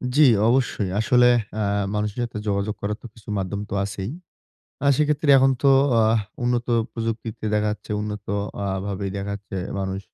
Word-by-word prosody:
জি, 155 - +5 0.3
অবশ্যই। 120 -6 +1
আসলে 125 +2 +4 0.3
আ - - 0 0.3
মানুষের 105 +2 -2
সাথে 115 -3 -5
যোগাযোগ 100 +1 -1
করার 105 +1 -2
তো - - -8
কিছু 110 - -14
মাধ্যম 95 +1 -3
তো - - -5
আছেই। 100 +1 -4 0.8
আর 140 - +5
সেক্ষেত্রে 150 -1 +2
এখন 135 +1 +5
তো 140 - +5 0.3
আহ 110 +1 +3 0.2
উন্নত 120 0 0 0.3
প্রযুক্তিতে 115 -1 -4
দেখা 105 0 +2
যাচ্ছে, 105 - -11
উন্নত 105 -1 -5 0.4
আ - - -1 0.2
ভাবেই 100 -1 -3
দেখা 100 +1 -4
যাচ্ছে 100 -1 -8 0.2
মানুষ। 95 0 -3
105 Hz, 165 wpm, -23 LUFS, 100-120 Hz, 0.8 s, জি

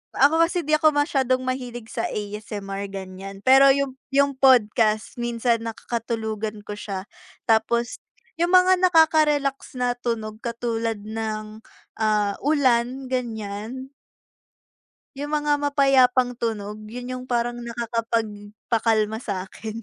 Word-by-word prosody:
Ako 320 +5 +5
kasi 345 +1 0
di 305 - +4
ako 310 0 +4
masyadong 270 -3 +1
mahilig 245 -3 -4
sa - - -4
ASMR 205 -1 -5
ganyan, 195 0 -8
pero 270 +5 +7
yung 275 -1 -1 0.2
yung 280 0 +2
podcast 225 -4 +3
minsan 235 -1 0
nakakatulugan 220 -2 -4
ko 210 - -5
siya. 200 -1 -6 0.4
Tapos 235 +1 +2 0.4
yung 345 +1 0
mga 370 0 +6
nakaka-relax 310 -5 +3
na 245 -1 +1
tunog 225 -3 -4
katulad 230 -2 -2
ng, 215 0 -5 0.3
ah, 210 -2 +1
ulan 260 -3 +1
ganyan. 235 +1 -4 1.3
Yung 285 +1 -4
mga 295 -1 +1
mapayapang 270 -3 +3
tunog 210 -2 -3
yun 245 +3 -7
yung 255 0 -5
parang 240 0 -1
nakakapag 230 -1 -2 0.4
pakalma 220 -1 +1
sa 200 -6 -4
akin. 215 +3 -8
235 Hz, 120 wpm, -23 LUFS, 215-270 Hz, 1.3 s, pero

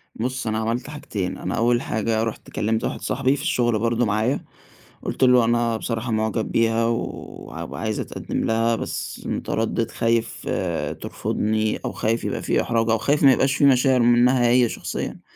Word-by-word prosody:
بُصّ، 125 +1 -3
أنا 110 0 0
عملت 115 +5 -2
حاجتين، 105 -11 -4
أنا - - -3
أوّل 120 +1 +2
حاجة 110 +1 -1
رُحت 115 - -5
كلّمت 110 +1 -1
واحد - - -3
صاحبي 135 +2 +1
في 140 - -6
الشغل 120 -5 +1
برضه 115 +1 +1
معايا، 110 +5 0 0.6
قُلت - - -4
له 125 -2 +6
أنا 120 0 +1
بصراحة 115 +1 -3
معجب 110 0 -1
بيها، 115 0 +2
ووعايز 115 0 -4
اتقدّم - - -4
لها 115 +1 +2
بس - - -5
متردّد، 115 0 -1
خايف 115 0 -1 0.5
ترفضني، 110 0 -1
أو - - -2
خايف 115 +2 -1
يبقى - - -2
في - - +1
إحراج، 115 -1 0
أو 115 - +3
خايف 140 +7 +1
ما 135 -2 +8
يبقاش 135 +1 +2
في 145 - +2
مشاعر 130 -1 +5
منها 120 +1 +4
هي 120 -1 +4
شخصيًا، - - -5
115 Hz, 165 wpm, -23 LUFS, 110-125 Hz, 0.6 s, ما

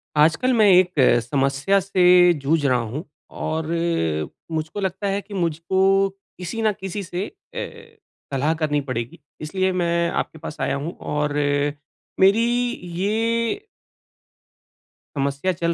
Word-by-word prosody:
आजकल 165 +13 +3
मैं 220 -3 +5
एक 180 0 +5 0.3
समस्या 140 +9 +1
से 180 -2 +5
जूझ 150 0 0
रहा 130 -2 +3
हूँ 120 +7 -4 0.4
और 160 0 -2 0.8
मुझको 155 +4 -3
लगता 190 +1 -2
है 200 +1 -1
कि 205 - -13
मुझको 190 +3 +2 0.3
किसी 185 +5 -4
न 215 -1 +3
किसी 195 +1 -4
से 180 +2 -4 0.3
ए, - - -8 0.4
सलाह 145 +4 +1
करनी 155 -2 0
पड़ेगी 120 -3 -5 0.2
इसलिए 185 +5 0
मैं 170 -1 +1
आपके 160 - -3
पास 150 - -7
आया - - 0
हूँ 150 +5 -4 0.2
और 150 0 0 0.9
मेरी 200 +5 +5 0.5
ये 230 - 0 1.5
समस्या 140 +5 0
चल 170 0 -1
175 Hz, 125 wpm, -22 LUFS, 150-195 Hz, 1.5 s, मैं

